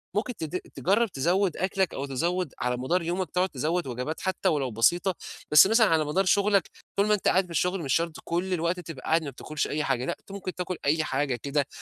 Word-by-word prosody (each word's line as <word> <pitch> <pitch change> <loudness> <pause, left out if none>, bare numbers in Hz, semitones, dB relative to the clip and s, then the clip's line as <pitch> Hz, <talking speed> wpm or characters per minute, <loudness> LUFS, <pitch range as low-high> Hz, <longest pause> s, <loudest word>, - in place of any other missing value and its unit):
ممكن 230 +3 -1
تد 165 +1 -4 0.2
تجرب 210 +5 +2
تزود 175 +6 +1
أكلك 190 -1 0
أو 140 - -3
تزود 170 +4 -1
على 125 0 -1
مدار 150 +9 0
يومك 175 +1 -2
تقعد 185 +1 +1
تزود 155 +4 -1
وجبات 125 +6 -4
حتى 190 -1 0
ولو 140 -5 0
بسيطة، 175 - +2 0.4
بس 150 +5 +9
مثلًا 225 +1 +5
على 160 -2 +2
مدار 185 +7 +1
شغلك 200 -1 +3 0.3
طول 200 - +4
ما 210 - +4
أنت 210 - 0
قاعد 190 0 +3
في 175 - -14
الشغل 180 +3 0
مش 135 - 0
شرط 165 -1 +1
كل 180 +2 -1
الوقت 170 +1 0
تبقى 165 -6 -9
قاعد 160 0 +2
ما 145 - -4
بتاكلش 150 +3 -4
أي 150 +1 -1
حاجة، 130 -2 0
لأ، - - -2
أنت - - -16
ممكن 190 -2 -6
تاكل 180 0 -3
أي 155 +3 +2
حاجة 135 -3 -1
كده، 140 +3 -1
170 Hz, 225 wpm, -27 LUFS, 145-185 Hz, 0.4 s, بس